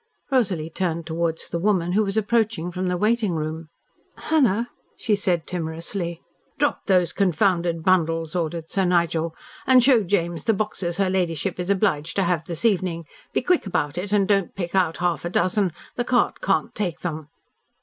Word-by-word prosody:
Rosalie 185 -11 +1
turned 170 -2 -2
towards 165 0 -2
the 170 - -2
woman, 180 -2 +1
who 210 +4 +3
was 195 +1 -2
approaching 220 -5 +1
from 185 +1 -2
the 180 0 0
waiting 215 -1 +1
room. 155 +1 -4 0.5
"Hannah," 240 -7 +1 0.3
she 215 - +1
said 180 -5 0
timorously. 170 +1 -4 0.3
"Drop - - 0
those 180 -3 +3
confounded 175 -3 +1
bundles," 165 -3 +1
ordered 165 -1 -2
Sir 195 +3 0
Nigel, 170 -2 +1 0.3
"and 255 -2 +6
show 250 -3 +5
James 175 -4 -1
the 225 - +3
boxes 190 -4 -2
her 195 -2 +1
ladyship 180 -1 -1
is 180 +1 -3
obliged 185 -6 +1
to 195 - +2
have 170 -2 0
this 170 +4 -2
evening. 180 -6 +1 0.3
Be - - 0
quick 355 - +2
about 145 -6 -1
it 195 +3 -4
and 200 -2 +3
don't 195 -4 +1
pick 175 -3 -4
out 180 -4 +2
half 175 -2 0
a 175 - -2
dozen. 185 +2 +1 0.3
The 245 - +1
cart 245 0 +1
can't 190 -5 0
take 180 -5 -3
them." 155 -3 -4
180 Hz, 175 wpm, -23 LUFS, 165-200 Hz, 0.5 s, and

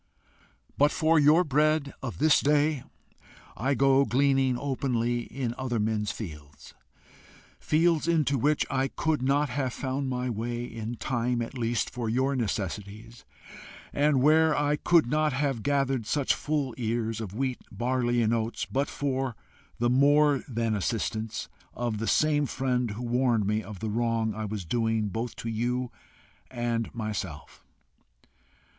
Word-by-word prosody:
But 145 +1 +6
for 160 -1 +3
your 150 +4 +5
bread 150 -1 +1
of 125 -3 -5
this 155 +1 +4
day, 150 -1 +2 0.7
I 135 +5 0
go 135 +1 +4
gleaning 135 0 +2
openly 120 -3 -1
in 125 -4 -4
other 125 -3 -1
men's 105 -1 0
fields 75 -8 -9 0.9
fields 165 0 +2
into 155 -5 +2
which 150 +4 +2
I 135 0 +1
could 155 +1 -1
not 140 +2 +2
have 130 -2 -2
found 135 +1 -3
my 125 0 -2
way, 120 +1 -3
in 115 0 -6
time 120 0 -1
at 115 - -8
least 120 -2 -1
for 120 -2 -3
your 130 +4 +1
necessities, 100 - -4 0.7
and 145 -2 +2
where 155 +1 +4
I 145 0 +2
could 170 0 +3
not 150 +3 +1
have 135 -3 -1
gathered 135 -3 0
such 145 +1 +1
full 145 -4 -2
ears 115 -1 -1
of 100 -2 -6
wheat, 130 0 -1
barley, 120 +2 0
and 110 +1 +2
oats 115 0 -1
but 140 +2 -1
for 135 -3 -2 0.4
the 120 - +1
more 145 +1 +4
than 115 -3 -1
assistance 110 +1 -2 0.3
of 120 -3 -2
the 115 - -2
same 150 -2 +2
friend 125 -1 -1
who 105 +4 -6
warned 120 -3 +1
me 105 +2 0
of 100 -1 -10
the 110 - -2
wrong 115 -1 0
I 110 +1 -4
was 105 -3 -5
doing 110 +2 0
both 115 +5 -4
you 120 +2 -1 0.6
and 120 -2 -2
myself. 100 -9 -5
125 Hz, 145 wpm, -27 LUFS, 115-140 Hz, 0.9 s, But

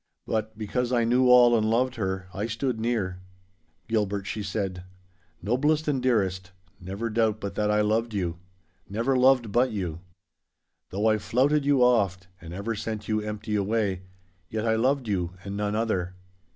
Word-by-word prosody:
But, 110 -1 -2
because 120 +3 -2
I 120 -2 +3
knew 125 +2 +3
all 120 -1 +7
and 110 -1 +2
loved 125 +3 +2
her, 95 -5 -3
I 105 +3 -2
stood 115 +1 -2
near. 105 -6 -1 0.7
'Gilbert,' 105 -3 -1
she 105 +2 -4
said, 95 -3 -3 0.6
'noblest 150 +8 +1
and 140 -3 +1
dearest, 95 -7 0 0.3
never 100 +5 -4
doubt 110 -1 +1
but 100 -1 -5
that 105 0 0
I 105 0 +3
loved 110 +2 +1
you—never 95 +7 -4
loved 125 -3 +4
but 125 +4 +3
you. 90 -6 -3 0.9
Though 100 +3 -2
I 110 -1 +3
flouted 140 +7 +2
you 140 -3 +4
oft, 100 -7 +2
and 80 - -9
ever 100 +6 -3
sent 110 0 -5
you 110 -1 0
empty 105 0 -4
away, 100 -2 0 0.5
yet 110 0 -2
I 110 -1 +2
loved 130 +2 +1
you 90 -4 -1
and 100 0 -5
none 105 0 -1
other. 95 -5 -1
110 Hz, 165 wpm, -26 LUFS, 100-120 Hz, 0.9 s, all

